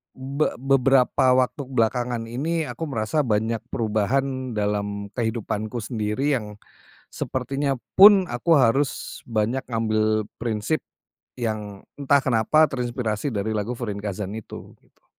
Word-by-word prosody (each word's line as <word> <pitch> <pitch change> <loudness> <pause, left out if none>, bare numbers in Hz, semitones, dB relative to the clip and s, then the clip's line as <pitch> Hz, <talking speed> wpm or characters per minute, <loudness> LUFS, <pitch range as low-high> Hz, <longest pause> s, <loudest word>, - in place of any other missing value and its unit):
be 135 +3 -1
beberapa 135 0 +3
waktu 140 +3 -5
belakangan 120 -1 0
ini 160 +7 -1
aku 165 - -5
merasa 115 +4 -1
banyak 110 +1 0
perubahan 130 +4 -1
dalam 100 -1 -2
kehidupanku 110 -1 -2
sendiri 110 +5 -1
yang, 105 -3 -8 0.6
sepertinya 135 +2 -2 0.2
pun 195 -1 +9
aku 120 +8 -2
harus 135 +3 0
banyak 115 +3 0
ngambil 110 -2 +1
prinsip, 115 +6 -1 0.6
yang 105 -4 -4
entah 140 0 +4
kenapa 130 +5 +3
terinspirasi 120 -2 -2
dari 110 -2 -2
lagu 110 +3 -2
Furinkazan 100 -3 -4
itu, 110 -1 -9
gitu. - - -34
115 Hz, 115 wpm, -24 LUFS, 110-135 Hz, 0.6 s, pun